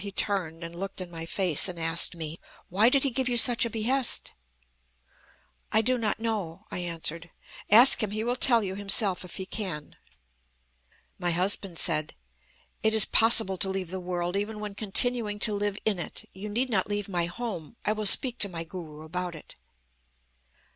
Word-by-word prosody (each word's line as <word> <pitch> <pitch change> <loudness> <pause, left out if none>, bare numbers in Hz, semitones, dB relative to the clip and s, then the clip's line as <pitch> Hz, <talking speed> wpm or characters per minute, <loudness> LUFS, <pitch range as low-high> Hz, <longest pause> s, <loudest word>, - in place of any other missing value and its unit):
He 200 - -7
turned, 180 -5 -2
and 170 0 -9
looked 195 +3 -7
in 180 -2 -7
my 165 -1 -8
face, 180 -4 +1
and 180 -2 -8
asked 165 +2 0
me: 160 0 -7 0.3
'Why 205 +6 +3
did 270 +1 +1
he 275 - 0
give 255 +1 -2
you 240 - 0
such 235 0 +5
a - - -3
behest?' 235 +4 -1 1.4
"'I 220 - +3
do 250 +3 0
not 215 -2 -2
know,' 210 -8 -4
I - - -4
answered. 165 -1 -3 0.4
'Ask 235 +6 +7
him! 215 - -1
He 215 +2 -4
will 240 +1 -1
tell 240 -3 +3
you 190 -1 -4
himself, 195 -1 +2
if 180 - -10
he 190 - -6
can.' 185 -8 -5 1.2
"My 175 - -1
husband 180 +1 0
said: 155 -3 0 0.7
'It 220 0 +1
is 220 - +7
possible 225 -4 +5
to 190 - +2
leave 190 -2 -5
the 190 - -5
world, 175 0 -4
even 210 +2 -4
when 210 -1 -7
continuing 215 +1 +2
to 215 0 0
live 205 0 -3
in 210 -4 0
it. - - -7
You 200 +3 -8
need 245 +5 -2
not 195 -2 -1
leave 205 -1 -3
my 175 -3 -2
home. 195 -3 -7
I 210 - +1
will 215 -1 +1
speak 245 +4 +6
to 200 - +2
my 165 -2 -6
Guru 160 -3 -10
about 175 +2 -5
it.' 155 - -11
195 Hz, 190 wpm, -26 LUFS, 175-220 Hz, 1.4 s, Ask